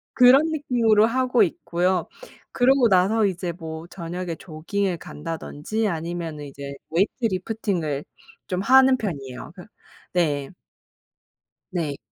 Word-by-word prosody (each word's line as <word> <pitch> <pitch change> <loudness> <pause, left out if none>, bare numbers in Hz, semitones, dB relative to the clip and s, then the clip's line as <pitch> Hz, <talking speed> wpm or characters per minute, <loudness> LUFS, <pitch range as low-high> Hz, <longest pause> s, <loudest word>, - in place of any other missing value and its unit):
그런 255 +3 +7
느낌으로 235 -8 +3
하고 250 -1 +2
있고요. 180 0 0 0.5
그러고 255 -1 +4
나서 200 +4 +3
이제 180 -2 -2
뭐 160 -1 -7
저녁에 175 -1 -5
조깅을 175 +3 -3
간다든지 165 +8 -4
아니면은 165 -2 -4
이제 140 0 -8 0.2
weight 190 +5 +3
lifting을 185 -8 -1 0.4
좀 180 0 -2
하는 260 +4 +6
편이에요. 140 - -6
그 180 0 -12 0.5
네. 145 -6 +1 1.2
네. 155 -6 -2
180 Hz, 290 characters per minute, -24 LUFS, 160-225 Hz, 1.2 s, 그런